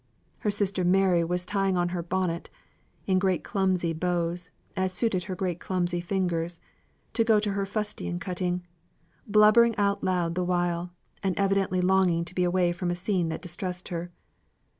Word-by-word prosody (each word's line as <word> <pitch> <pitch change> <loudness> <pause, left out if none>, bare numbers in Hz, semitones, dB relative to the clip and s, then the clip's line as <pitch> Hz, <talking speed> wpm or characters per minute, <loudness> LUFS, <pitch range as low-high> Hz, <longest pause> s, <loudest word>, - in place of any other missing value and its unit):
Her 210 - 0
sister 200 -2 +1
Mary 180 -1 +4
was 180 +1 -1
tying 195 -1 0
on 175 0 +1
her 175 -1 -2
bonnet 175 -1 -2 0.6
(in 185 -1 +3
great 185 -5 +1
clumsy 185 -4 0
bows, 175 +1 -1 0.3
as 190 -1 0
suited 185 -3 0
her 190 -2 -4
great 180 -3 -2
clumsy 175 -1 -1
fingers), 175 -2 -1 0.5
to 230 - +3
go 220 -2 +4
to 210 -1 -1
her 195 0 -1
fustian 210 -4 -3
cutting, 180 -1 -2 0.6
blubbering 215 +2 +6
out 200 -1 +1
loud 175 -3 +1
the 180 +1 -1
while, 175 -1 0 0.3
and 190 -2 -1
evidently 195 -2 +1
longing 180 -2 +3
to 170 - -6
be 180 - +1
away 175 0 +2
from 175 0 -3
a 175 - 0
scene 180 -2 0
that 160 - -5
distressed 180 +1 -4
her. 175 0 -4
180 Hz, 165 wpm, -27 LUFS, 175-195 Hz, 0.6 s, blubbering